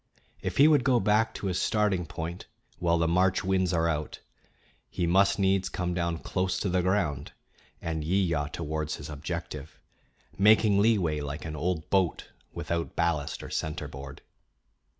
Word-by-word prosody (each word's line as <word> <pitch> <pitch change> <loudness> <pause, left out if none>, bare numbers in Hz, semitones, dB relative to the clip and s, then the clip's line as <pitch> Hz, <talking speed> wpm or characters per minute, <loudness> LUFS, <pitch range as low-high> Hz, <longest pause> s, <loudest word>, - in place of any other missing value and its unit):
If - - -4
he 145 - +8
would 150 -5 +4
go 125 -3 +3
back 110 +2 +2
to - - -5
his 90 -2 0
starting 105 -5 +1
point 80 +3 -6 0.3
while 85 -1 +2
the 85 0 +1
March 90 +2 +2
winds 95 -1 +1
are 85 -2 +1
out, 75 -2 -3 0.7
he 90 - -2
must 95 +3 +3
needs 95 -1 +2
come 90 -1 -2
down 85 -1 -1
close 95 +2 -2
to 100 - 0
the 90 0 +2
ground 90 -7 -1 0.5
and 80 -2 -2
yewyaw 85 -4 0
towards 80 -1 -3
his 75 +1 -8
objective, 75 0 -6 0.6
making 105 0 +5
leeway 100 -8 +2
like 70 +2 -5
an 80 -1 -5
old 80 +1 -2
boat 95 -4 +1 0.2
without 85 -1 -3
ballast 85 -4 -1
or - - -8
centerboard. 70 -3 -5
85 Hz, 155 wpm, -28 LUFS, 80-95 Hz, 0.7 s, he